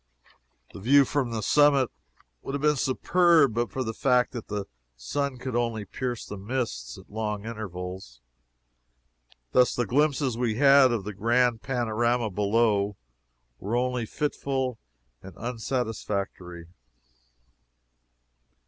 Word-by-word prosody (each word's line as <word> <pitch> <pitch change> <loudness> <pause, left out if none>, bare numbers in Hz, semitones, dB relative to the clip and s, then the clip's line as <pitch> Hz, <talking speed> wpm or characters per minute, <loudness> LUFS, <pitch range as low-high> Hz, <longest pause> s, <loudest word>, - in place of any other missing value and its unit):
The - - -9
view 140 +7 +5
from 135 -2 -1
the 110 -2 -3
summit 140 0 +4 0.5
would 135 - -5
have 140 - -3
been 150 0 +4
superb 155 +1 +3
but 120 +1 -1
for 130 - -3
the 110 -2 -4
fact 125 0 +2
that 120 -3 -7
the 105 -1 -3 0.3
sun 135 - -3
could 125 -1 -5
only 115 -3 -1
pierce 125 +2 -4
the 100 - -8
mists 100 - -4
at - - -14
long 105 -1 -3
intervals. 90 - -7 1.3
Thus 125 -1 +4
the 120 - 0
glimpses 135 0 +1
we 120 -3 0
had 135 0 +6
of 115 -4 -1
the 105 +2 -6
grand 120 +3 +2
panorama 120 -2 0
below 105 0 +1 0.6
were 105 +5 -3
only 125 -2 -1
fitful 135 -3 -2 0.4
and 95 -4 -12
unsatisfactory. 110 -7 -4
120 Hz, 125 wpm, -26 LUFS, 105-130 Hz, 1.3 s, had